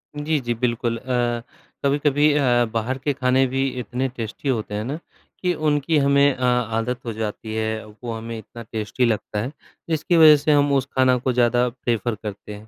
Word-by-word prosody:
जी, 150 Hz, +1 st, 0 dB
जी, 120 Hz, -2 st, -2 dB
बिल्कुल 120 Hz, 0 st, -1 dB
अ, 120 Hz, -1 st, -1 dB, 0.4 s
कभी-कभी 145 Hz, +1 st, +3 dB
अ, 125 Hz, -4 st, +3 dB
बाहर 115 Hz, +3 st, -1 dB
के 140 Hz, +2 st, -1 dB
खाने 130 Hz, 0 st, +2 dB
भी 135 Hz, +1 st, 0 dB
इतने 125 Hz, +3 st, -2 dB
टेस्टी 115 Hz, +5 st, -4 dB
होते 110 Hz, -5 st, -2 dB
हैं 105 Hz, -, -2 dB
ना, 140 Hz, +7 st, -4 dB, 0.4 s
कि 180 Hz, -1 st, +1 dB
उनकी 155 Hz, -1 st, +1 dB
हमें 140 Hz, 0 st, +4 dB
अ, -, -, -11 dB
आदत 125 Hz, 0 st, 0 dB
हो 115 Hz, -, -3 dB
जाती 110 Hz, 0 st, -5 dB
है, 110 Hz, 0 st, -2 dB
वो 110 Hz, +3 st, -8 dB
हमें 115 Hz, +1 st, -6 dB
इतना 115 Hz, +2 st, -10 dB
टेस्टी 110 Hz, +3 st, -1 dB
लगता 110 Hz, -2 st, -1 dB
है 125 Hz, +5 st, -4 dB, 0.4 s
जिसकी 160 Hz, +2 st, +1 dB
वजह 155 Hz, -2 st, +9 dB
से 150 Hz, +2 st, +1 dB
हम 145 Hz, -1 st, +4 dB
उस 135 Hz, -2 st, +2 dB
खाना 130 Hz, -1 st, +4 dB
को 125 Hz, +1 st, -1 dB
ज़्यादा 120 Hz, 0 st, +3 dB
प्रेफर 120 Hz, -2 st, -2 dB
करते 105 Hz, 0 st, -7 dB
हैं। 105 Hz, +1 st, -13 dB
125 Hz, 190 wpm, -22 LUFS, 115-140 Hz, 0.4 s, वजह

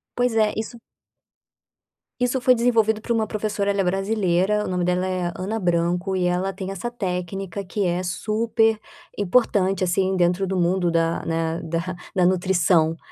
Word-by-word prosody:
Pois 245 Hz, -1 st, +1 dB
é, 215 Hz, -1 st, +3 dB
isso 220 Hz, +2 st, -5 dB, 1.4 s
isso 250 Hz, +1 st, +1 dB
foi 255 Hz, +1 st, +5 dB
desenvolvido 225 Hz, -2 st, +2 dB
por 235 Hz, -, -2 dB
uma 220 Hz, -2 st, 0 dB
professora, 210 Hz, -1 st, -1 dB
ela 200 Hz, 0 st, 0 dB
é -, -, +1 dB
brasileira, 195 Hz, +1 st, +1 dB
o -, -, -4 dB
nome 180 Hz, -1 st, -1 dB
dela 180 Hz, +1 st, 0 dB
é 185 Hz, -2 st, -1 dB
Ana 210 Hz, +4 st, -3 dB
Branco 175 Hz, +1 st, 0 dB
e 180 Hz, -, 0 dB
ela 180 Hz, +2 st, 0 dB
tem 190 Hz, 0 st, -5 dB
essa 195 Hz, +5 st, -4 dB
técnica 195 Hz, -2 st, -4 dB
que 195 Hz, +1 st, -2 dB
é 175 Hz, +1 st, 0 dB
super 220 Hz, +4 st, +1 dB, 0.4 s
importante, 195 Hz, -2 st, +2 dB
assim, 190 Hz, +1 st, +1 dB
dentro 180 Hz, +2 st, +2 dB
do 190 Hz, 0 st, -2 dB
mundo 175 Hz, 0 st, +1 dB
da 165 Hz, 0 st, 0 dB
né, 165 Hz, 0 st, -1 dB
da 170 Hz, +3 st, -3 dB, 0.2 s
da 180 Hz, -1 st, +4 dB
nutrição, 175 Hz, -3 st, +2 dB
190 Hz, 165 wpm, -23 LUFS, 180-215 Hz, 1.4 s, foi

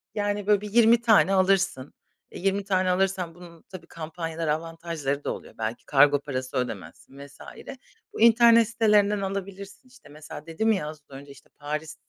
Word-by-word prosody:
yani, 205 Hz, -1 st, -2 dB
böyle, 205 Hz, -1 st, +3 dB
bir 210 Hz, -1 st, -8 dB
20 235 Hz, +1 st, +5 dB
tane 220 Hz, -4 st, +4 dB
alırsın. 190 Hz, -7 st, +1 dB, 0.4 s
Eee, -, -, -9 dB
20 195 Hz, +2 st, -1 dB
tane 185 Hz, -1 st, 0 dB
alırsan 185 Hz, -2 st, -1 dB
bunun 170 Hz, -2 st, -14 dB
tabii 180 Hz, -3 st, -11 dB
kampanyalar, 165 Hz, 0 st, -6 dB
avantajları 160 Hz, -2 st, -3 dB
da -, -, -2 dB
oluyor, -, -, -12 dB
belki 110 Hz, +1 st, -5 dB
kargo 145 Hz, 0 st, +4 dB
parası 130 Hz, -2 st, -5 dB
ödemezsin 130 Hz, +2 st, -6 dB
vs. 140 Hz, -, -21 dB, 0.7 s
Bu -, -, -6 dB
internet 230 Hz, 0 st, +6 dB
sitelerinden 210 Hz, -3 st, +2 dB
alabilirsin, 195 Hz, +3 st, -7 dB
işte, 250 Hz, -, -19 dB
mesela 150 Hz, 0 st, -11 dB
dedim 195 Hz, +7 st, 0 dB
ya, 190 Hz, -8 st, -1 dB
az 155 Hz, 0 st, -9 dB
önce, 140 Hz, +1 st, -12 dB
işte, 140 Hz, -, -18 dB
Paris 150 Hz, +2 st, -5 dB
180 Hz, 165 wpm, -25 LUFS, 150-205 Hz, 0.7 s, internet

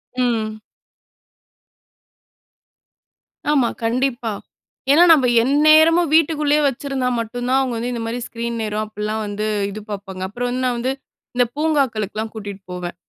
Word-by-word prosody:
ம். 225 Hz, -4 st, -1 dB, 2.9 s
ஆமா, 265 Hz, -6 st, +3 dB
கண்டிப்பா, 240 Hz, 0 st, 0 dB, 0.6 s
ஏனா 315 Hz, +5 st, +7 dB
நாம 270 Hz, -6 st, +5 dB
எந்நேரமும் 310 Hz, +4 st, +5 dB
வீட்டுக்குள்ளேயே 300 Hz, -2 st, +3 dB
வைச்சிருந்தா 270 Hz, -1 st, -1 dB
மட்டும் 245 Hz, +2 st, -4 dB
தான், 265 Hz, -, +3 dB
அவங்க 255 Hz, -2 st, -2 dB
வந்து 240 Hz, +2 st, -3 dB
இந்த 235 Hz, -, -4 dB
மாதிரி 230 Hz, +2 st, -3 dB
ஸ்கிரீன் 235 Hz, 0 st, -4 dB
நேரம் 215 Hz, 0 st, -2 dB
அப்பல்லாம் 215 Hz, +1 st, -4 dB
வந்து 205 Hz, +1 st, -3 dB, 0.2 s
இது 205 Hz, +2 st, -7 dB
பார்ப்பாங்க, 195 Hz, -2 st, -7 dB
அப்புறம் 245 Hz, +5 st, -3 dB
வந்து 255 Hz, +1 st, -2 dB
நான் 245 Hz, -1 st, 0 dB
வந்து, 250 Hz, +2 st, -1 dB, 0.4 s
இந்த 245 Hz, -, +3 dB
பூங்காக்களுக்குலாம் 225 Hz, -9 st, -1 dB
கூட்டிட்டு 200 Hz, -3 st, -7 dB
போவேன், 175 Hz, -1 st, -5 dB
245 Hz, 130 wpm, -20 LUFS, 215-275 Hz, 2.9 s, ஏனா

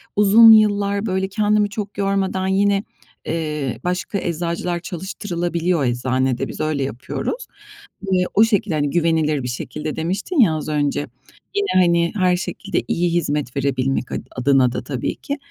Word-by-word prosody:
uzun 210 Hz, +3 st, +8 dB
yıllar, 205 Hz, -1 st, +3 dB
böyle, 190 Hz, -1 st, 0 dB
kendimi 210 Hz, 0 st, +1 dB
çok 205 Hz, -2 st, -6 dB
yormadan, 195 Hz, -1 st, 0 dB
yine, 200 Hz, +1 st, +2 dB, 0.4 s
eee, 150 Hz, -6 st, -3 dB
başka 180 Hz, +3 st, -2 dB
eczacılar 170 Hz, 0 st, -2 dB
çalıştırılabiliyor 175 Hz, -3 st, -2 dB
eczanede, 130 Hz, +1 st, 0 dB
biz -, -, -9 dB
öyle 155 Hz, -3 st, -1 dB
yapıyoruz. 135 Hz, -, -4 dB, 0.6 s
Eee, 180 Hz, -1 st, +3 dB
o 215 Hz, -, +6 dB
şekilde, 210 Hz, -6 st, +1 dB
hani, 145 Hz, -1 st, 0 dB
güvenilir 160 Hz, -3 st, +1 dB
bir -, -, -3 dB
şekilde 150 Hz, +5 st, -5 dB
demiştin 190 Hz, -, -2 dB
ya, 200 Hz, -10 st, +5 dB
az 155 Hz, -, -4 dB
önce, 145 Hz, -1 st, -1 dB, 0.5 s
yine, 405 Hz, 0 st, +1 dB, 0.2 s
hani, 170 Hz, -1 st, +2 dB
her 185 Hz, -2 st, +3 dB
şekilde 180 Hz, -1 st, -3 dB
iyi 175 Hz, 0 st, 0 dB
hizmet 150 Hz, -6 st, -1 dB
verebilmek 135 Hz, -1 st, -1 dB
ad -, -, -3 dB
adına 130 Hz, -1 st, +3 dB
da 120 Hz, -, -4 dB
tabii 130 Hz, -1 st, -3 dB
ki. 285 Hz, -, -5 dB
170 Hz, 145 wpm, -20 LUFS, 145-200 Hz, 0.6 s, uzun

